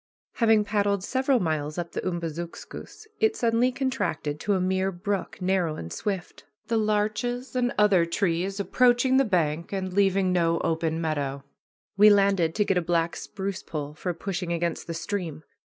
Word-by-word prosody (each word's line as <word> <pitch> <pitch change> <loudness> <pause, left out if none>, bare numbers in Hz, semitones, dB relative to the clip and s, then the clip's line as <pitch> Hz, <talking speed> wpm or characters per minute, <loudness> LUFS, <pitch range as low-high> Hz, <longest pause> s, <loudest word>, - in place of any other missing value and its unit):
Having 220 -2 +4
paddled 200 -2 0
several 260 +3 +1
miles 155 -4 -2
up 170 -1 -4
the - - -3
Umbazookskus, 170 - -6
it 440 0 +3
suddenly 235 - +2
contracted 250 - -2
to 205 - 0
a - - +1
mere 190 +1 0
brook, 195 +2 -3
narrow 180 -4 0
and 85 - -7
swift, 195 -4 -4 0.3
the 230 - +2
larches 215 +4 -1
and 245 -1 +1
other 205 -4 +5
trees 185 +2 -1
approaching 245 +6 +3
the 270 - +5
bank 170 -5 0
and 190 -2 -3
leaving 195 -1 +2
no 170 -1 +2
open 160 0 0
meadow. 145 -4 -2 0.5
We 210 +1 +8
landed 195 -5 +3
to 210 - +2
get 195 - +1
a - - -2
black 170 0 0
spruce 195 -1 -5
pole 150 -2 -5
for 180 +4 -3
pushing 180 -1 -4
against 170 0 -2
the 165 - -4
stream. 165 -3 -4
190 Hz, 165 wpm, -26 LUFS, 165-210 Hz, 0.5 s, We